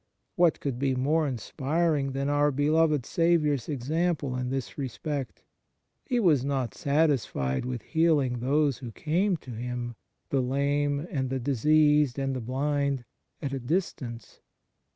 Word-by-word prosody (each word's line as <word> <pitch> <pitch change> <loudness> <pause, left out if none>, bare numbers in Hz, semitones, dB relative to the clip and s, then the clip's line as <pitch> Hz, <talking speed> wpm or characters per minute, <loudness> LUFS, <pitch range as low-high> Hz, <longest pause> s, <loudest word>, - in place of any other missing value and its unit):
What 175 -2 +3
could 135 -4 -3
be 135 -1 +1
more 150 +5 +1
inspiring 140 +4 -1
than 135 +1 -1
our 145 0 +3
beloved 150 0 +2
Saviour 165 -3 +2
s 135 -2 -4
example 150 0 -1
in 125 0 -2
this 130 -7 -3
respect? 140 +1 -4 0.6
He 250 -3 +1
was 160 - +4
not 135 -4 -1
satisfied 140 - 0
with 125 -2 -4
heal 160 -1 +3
ing 125 -3 -1
those 140 +1 +1
who 125 -3 -7
came 175 - +1
to 130 - -11
Him 120 +1 -4 0.4
the 135 - +2
lame 140 +3 0
and 130 -6 -1
the 135 0 -1
diseased 150 +2 +3
and 135 -1 -1
the 130 - -3
blind 140 +1 -1 0.4
at 140 -1 -2
a 135 - -2
distance. 125 - -3
140 Hz, 150 wpm, -28 LUFS, 125-155 Hz, 0.6 s, was